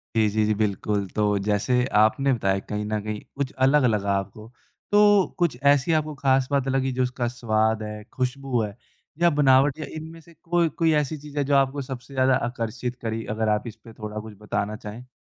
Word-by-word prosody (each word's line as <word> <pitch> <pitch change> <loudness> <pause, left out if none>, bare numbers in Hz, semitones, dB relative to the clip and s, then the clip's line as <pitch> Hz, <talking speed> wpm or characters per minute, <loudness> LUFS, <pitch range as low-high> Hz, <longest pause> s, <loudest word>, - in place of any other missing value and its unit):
जी, 110 -1 +4
जी, 110 +1 +1
जी, 105 - +2
बिल्कुल। 100 -1 0
तो 105 -1 +2
जैसे 125 +4 +2
आपने 120 +6 +4
बताया 95 -4 0
कहीं 105 0 -2
न 105 0 -1
कहीं, 105 0 -4 0.2
कुछ 140 -1 -2
अलग-अलग 125 -8 +3
आपको, 100 +3 -4 0.4
तो 205 -2 +5
कुछ 170 -8 +1
ऐसी 145 +3 +2
आपको 155 -1 0
ख़ास 130 -1 +3
बात 135 -1 +1
लगी, 135 0 0
जो 130 0 0
उसका 125 -1 -2
स्वाद 110 -2 0
है, 105 0 -7
ख़ुशबू 130 -2 -1
है, 105 -2 -4 0.5
या 170 - +6
बनावट 140 0 +4
या 155 - -4
इनमें 160 +1 -8
से 170 +2 -19
कोई 170 -1 +2
कोई 165 -1 +4
ऐसी 150 +3 -5
चीज़ 145 0 -11
है 145 - +2
जो 140 +1 +1
आपको 135 +1 +2
सबसे 130 0 -8
ज़्यादा 130 0 +3
आकर्षित 120 +1 -4
करी? 115 -1 -3
अगर 110 0 -1
आप 115 - -9
इसपे 115 +1 -11
थोड़ा 105 0 -6
कुछ 110 0 -9
बताना 105 0 -2
चाहें? 115 +3 -9
125 Hz, 195 wpm, -24 LUFS, 110-140 Hz, 0.5 s, या